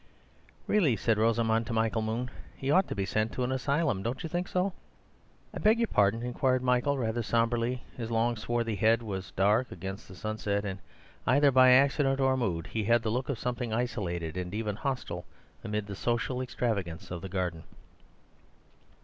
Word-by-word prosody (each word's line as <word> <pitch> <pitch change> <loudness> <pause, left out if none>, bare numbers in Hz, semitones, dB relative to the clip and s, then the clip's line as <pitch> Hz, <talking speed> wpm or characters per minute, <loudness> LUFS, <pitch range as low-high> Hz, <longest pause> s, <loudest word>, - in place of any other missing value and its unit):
"Really," 170 - +3
said 110 -1 +1
Rosamund 115 0 +2
to - - -3
Michael 110 0 +1
Moon, 115 +3 -2 0.3
"he 135 +1 -1
ought 185 +5 +4
to - - -4
be 100 -2 -1
sent 110 +2 -1
to 125 - -1
an 125 - -1
asylum. 135 - 0
Don't 120 +5 -3
you 165 - -4
think 175 +3 -2
so?" 185 +1 0 0.8
"I - - -5
beg 220 +2 +4
your 230 -1 +1
pardon," 100 +4 +2
inquired 130 +1 +1
Michael, 125 +3 +2
rather 120 -1 -1
sombrely; 115 +2 0
his 115 -2 -5
long, 115 +1 +1
swarthy 115 0 -1
head 115 +3 +3
was 95 -3 -5
dark 105 +6 +2
against 95 +4 -7
the 95 - -11
sunset, 105 0 -2
and, 95 -1 -4 0.5
either 140 +2 +5
by 130 0 +7
accident 135 +1 +4
or 130 -1 +3
mood, 90 -10 -1
he 110 -2 -3
had 115 +1 +3
the 110 - 0
look 125 +4 -2
of 140 - -1
something 125 0 -3
isolated 90 -9 -2
and 90 +2 -4
even 105 -2 -2
hostile 125 -8 -3 0.4
amid 105 -2 -2
the 100 -1 -6
social 120 +4 -1
extravagance 100 -11 -3
of 85 -1 -4
the 95 - -6
garden. 90 -3 -2
115 Hz, 185 wpm, -29 LUFS, 105-130 Hz, 0.8 s, by